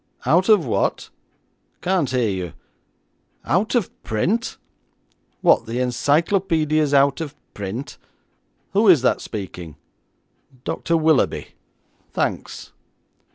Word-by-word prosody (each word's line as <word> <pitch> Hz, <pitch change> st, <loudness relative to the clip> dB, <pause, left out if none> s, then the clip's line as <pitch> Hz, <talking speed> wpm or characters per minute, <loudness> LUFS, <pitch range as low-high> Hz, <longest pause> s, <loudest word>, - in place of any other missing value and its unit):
Out 170 Hz, -, +3 dB
of 205 Hz, -8 st, +5 dB
what? 115 Hz, -, -1 dB, 0.7 s
Can't 180 Hz, -6 st, +1 dB
hear 125 Hz, -3 st, +1 dB
you. 95 Hz, -4 st, -3 dB, 0.9 s
Out 185 Hz, -, +1 dB
of 230 Hz, -7 st, +1 dB
print. 190 Hz, -, -1 dB, 0.8 s
What, -, -, +4 dB
the 115 Hz, +2 st, -3 dB
encyclopaedia's 155 Hz, +4 st, +1 dB
out 140 Hz, +1 st, +3 dB
of 150 Hz, -3 st, -5 dB, 0.2 s
print? 105 Hz, +7 st, -6 dB, 0.7 s
Who 210 Hz, +3 st, +3 dB
is 165 Hz, -9 st, +6 dB
that -, -, +2 dB
speaking? 90 Hz, -6 st, -7 dB, 0.9 s
Dr. 165 Hz, -, -1 dB
Willoughby; 160 Hz, -3 st, +2 dB, 0.6 s
thanks.' -, -, -3 dB
145 Hz, 100 wpm, -22 LUFS, 120-175 Hz, 0.9 s, is